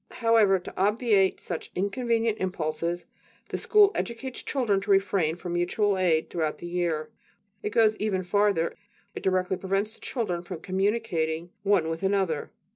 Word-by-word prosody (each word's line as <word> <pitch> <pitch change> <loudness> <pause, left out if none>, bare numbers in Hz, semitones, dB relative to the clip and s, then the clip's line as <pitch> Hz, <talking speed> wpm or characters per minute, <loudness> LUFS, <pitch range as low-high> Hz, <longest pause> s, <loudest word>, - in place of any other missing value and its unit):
However, 225 -4 +5
to 180 - -9
obviate 205 -2 +3
such - - -5
inconvenient 225 +3 0
impulses, 170 -1 -2 0.5
school 420 -2 +4
educates 245 +2 -4
children 225 -8 0
to 200 - -8
refrain 195 -5 +2
from 175 0 -6
mutual 195 +4 +1
aid 175 -4 +1
throughout 160 -3 -1
the - - -9
year. 170 -3 -2 0.5
It - - -2
goes 215 0 +4
even 195 -3 -1
farther: 200 -2 +2 0.4
it - - -6
directly 185 0 +1
prevents 195 +3 -1
the - - -15
children 200 -9 -2
from 175 -2 -8
communicating 185 -5 -1
one 195 -5 +2
with 165 0 -3
another. 190 -6 0
195 Hz, 145 wpm, -27 LUFS, 175-210 Hz, 0.5 s, However